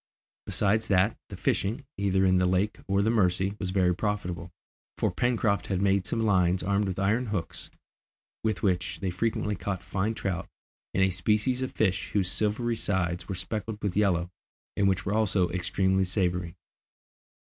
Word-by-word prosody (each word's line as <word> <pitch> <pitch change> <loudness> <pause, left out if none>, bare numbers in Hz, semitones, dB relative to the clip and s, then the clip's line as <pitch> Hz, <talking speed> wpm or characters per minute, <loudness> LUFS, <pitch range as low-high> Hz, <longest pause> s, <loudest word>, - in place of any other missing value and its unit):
Besides 110 +3 +1
that, 95 +2 +3
the - - -7
fishing, 115 +8 -1
either 95 -1 +2
in 95 0 +4
the 90 - +3
lake 95 +3 +1
or 100 0 +2
the 110 - +2
Mercy, 95 -3 +2
was 95 - -2
very 90 -2 +2
profitable, 90 -4 -3 0.5
for - - +1
Pencroft 115 -4 +1
had 95 -2 0
made 100 -1 +2
some 115 - 0
lines, 90 -3 +3
armed 100 +2 +1
with 95 - -3
iron 110 +6 +1
hooks, 95 -6 -4 0.7
with 110 -5 -1
which 90 -2 0
they 95 -2 -2
frequently 105 +2 -1
caught 95 -3 -4
fine 105 +3 -1
trout, 95 -5 -3 0.5
and 95 - +4
a 95 - +3
species 110 +7 +1
of 130 - -2
fish 95 -4 0
whose 95 -3 +1
silvery 110 +3 0
sides 90 -5 -1
were 95 - -2
speckled 105 +3 -4
with 100 -3 -1
yellow, 90 -4 +2 0.4
and 100 - +2
which 95 -2 +1
were 100 - 0
also 100 -4 +2
extremely 95 +2 +1
savoury. 90 -2 -1
95 Hz, 170 wpm, -28 LUFS, 90-105 Hz, 0.7 s, in